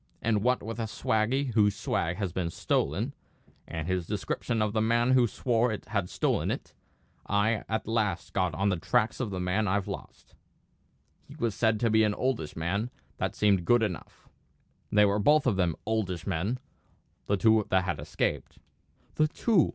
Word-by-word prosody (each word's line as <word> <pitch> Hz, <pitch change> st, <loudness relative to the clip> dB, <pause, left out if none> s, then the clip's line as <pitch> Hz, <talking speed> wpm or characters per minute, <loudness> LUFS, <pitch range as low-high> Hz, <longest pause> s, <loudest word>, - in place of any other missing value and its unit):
And 110 Hz, -2 st, +1 dB
what 125 Hz, +3 st, +1 dB
with 115 Hz, +2 st, -5 dB
a 115 Hz, -, -1 dB
swaggy 120 Hz, +5 st, 0 dB
whose 105 Hz, -2 st, +3 dB
swag 85 Hz, -3 st, -1 dB
had 95 Hz, -5 st, -3 dB
been 90 Hz, -3 st, -1 dB
stolen, -, -, -1 dB, 0.5 s
and 80 Hz, 0 st, -4 dB
his 90 Hz, -2 st, -1 dB
description 110 Hz, +2 st, -2 dB
of 105 Hz, -1 st, 0 dB
the 110 Hz, -, +1 dB
man 120 Hz, +3 st, +2 dB
who 130 Hz, -1 st, +6 dB
he 120 Hz, -, +3 dB
swore 115 Hz, -1 st, 0 dB
had 100 Hz, -5 st, -1 dB
stolen -, -, 0 dB
it, -, -, -4 dB, 0.5 s
I 105 Hz, +2 st, +1 dB
at 110 Hz, 0 st, -2 dB
last 105 Hz, -6 st, -1 dB
got 90 Hz, -4 st, 0 dB
on 100 Hz, +4 st, +1 dB
the 95 Hz, -, 0 dB
tracks 110 Hz, +6 st, +1 dB
of 125 Hz, -5 st, -1 dB
the 95 Hz, -2 st, -4 dB
man 95 Hz, +4 st, 0 dB
I've 100 Hz, +1 st, 0 dB
lost. -, -, -8 dB, 0.9 s
He -, -, -12 dB
was 115 Hz, -3 st, -1 dB
said 110 Hz, 0 st, +1 dB
to 115 Hz, -2 st, +2 dB
be 110 Hz, 0 st, +5 dB
an 105 Hz, -1 st, +1 dB
oldish 125 Hz, -, -2 dB
man; 95 Hz, +8 st, -1 dB, 0.3 s
that -, -, -2 dB
seemed 100 Hz, -4 st, +3 dB
good 120 Hz, +5 st, +4 dB
enough; 95 Hz, -6 st, -5 dB, 0.6 s
they 105 Hz, 0 st, +6 dB
were 100 Hz, +1 st, +2 dB
both 150 Hz, +8 st, +4 dB
of 125 Hz, -6 st, +2 dB
them 90 Hz, -4 st, +1 dB
oldish 100 Hz, -6 st, -1 dB
men, 100 Hz, +6 st, -1 dB, 0.7 s
the 100 Hz, -, +2 dB
two 110 Hz, +1 st, +4 dB
that 95 Hz, 0 st, +3 dB
had 90 Hz, -4 st, -2 dB
escaped." -, -, -2 dB, 0.6 s
"The 155 Hz, -, +3 dB
two!" 190 Hz, +2 st, +2 dB
105 Hz, 180 wpm, -28 LUFS, 95-115 Hz, 0.9 s, who